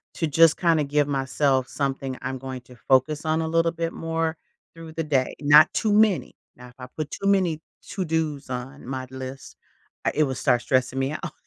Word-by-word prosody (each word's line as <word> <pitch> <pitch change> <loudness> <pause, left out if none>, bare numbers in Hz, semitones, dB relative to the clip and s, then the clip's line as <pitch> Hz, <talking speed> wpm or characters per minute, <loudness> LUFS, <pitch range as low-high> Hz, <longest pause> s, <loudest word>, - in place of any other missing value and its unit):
to 165 - -1
just 160 +2 +5
kinda 165 -4 +2
give 145 0 +1
myself 135 -1 0
something 135 -2 -3
I'm 130 - -4
going 130 -1 -7
to 125 +1 -16
focus 145 +4 +3
on 160 +1 +1
a 160 - -2
little 165 0 +2
bit 165 0 -3
more 165 0 -2 0.4
through 165 -1 -10
the 165 -1 -2
day, 135 -4 0
not 150 +1 +6
too 215 -2 0
many. 210 -3 +3 0.2
Now, 125 0 -12
if 125 - -18
I 125 - -7
put 155 -1 -4
too 200 - -4
many 180 -5 +2 0.2
to-dos 160 -7 -3
on 130 +3 -6
my 130 -1 -4
list 130 +1 -8 0.5
I - - +2
it 155 - +3
will 135 -2 -2
start 120 0 +2
stressing 130 0 0
me 135 +2 -1
out. - - -5
150 Hz, 200 wpm, -24 LUFS, 130-165 Hz, 0.5 s, not